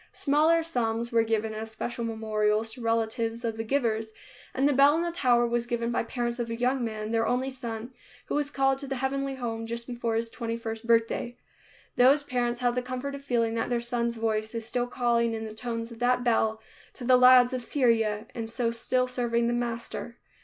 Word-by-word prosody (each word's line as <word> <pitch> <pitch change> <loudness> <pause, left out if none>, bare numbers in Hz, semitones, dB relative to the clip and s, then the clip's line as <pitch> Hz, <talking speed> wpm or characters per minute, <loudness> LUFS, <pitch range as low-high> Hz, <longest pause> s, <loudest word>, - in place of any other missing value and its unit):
Smaller 315 +4 +3
sums 235 -6 -1
were 230 -1 +4
given 220 -1 -1
as 220 +1 -5
special 235 +2 -4
memorials 220 -1 0
to 245 +2 -10
relatives 230 +1 -1
of 225 -1 -1
the 225 - -3
givers, 225 -3 -1 0.4
and 270 +2 +2
the 290 - +3
bell 280 +3 +6
in 335 - 0
the 345 - -1
tower 245 -7 +3
was 235 0 -1
given 235 0 -1
by 240 - +1
parents 240 +1 -3
of 235 -1 -2
a 230 - -2
young 250 +2 0
man, 215 -1 -4
their 225 0 +1
only 260 +2 0
son, 240 -1 -6 0.3
who - - -5
was 290 -1 0
called 270 -1 +1
to 280 - -7
the 270 - -2
heavenly 270 +1 -2
home 225 -3 -4
just 235 +1 -3
before 235 -2 -2
his 230 +1 0
twenty 230 -1 -4
first 225 0 -6
birthday. 230 +1 +1 0.6
Those 275 +4 +5
parents 245 -3 -1
have 245 -1 +2
the 250 - 0
comfort 255 +2 -4
of 280 0 -8
feeling 230 -4 +1
that 230 - -1
their 240 -1 +1
son's 235 0 -2
voice 220 0 -2
is 225 -1 -3
still 245 +1 -1
calling 235 -2 +1
in 220 0 -4
the 215 - -7
tones 230 0 -4
of 230 - -11
that 245 0 +2
bell 220 -2 +2 0.4
to - - -9
the 255 +1 +5
lads 250 0 +7
of 255 - -2
Syria, 230 -5 +1
and 225 -2 -5
so 230 0 -1
still 250 +2 +1
serving 240 -2 0
the 235 - +1
Master. 235 0 -4
235 Hz, 215 wpm, -27 LUFS, 225-250 Hz, 0.6 s, lads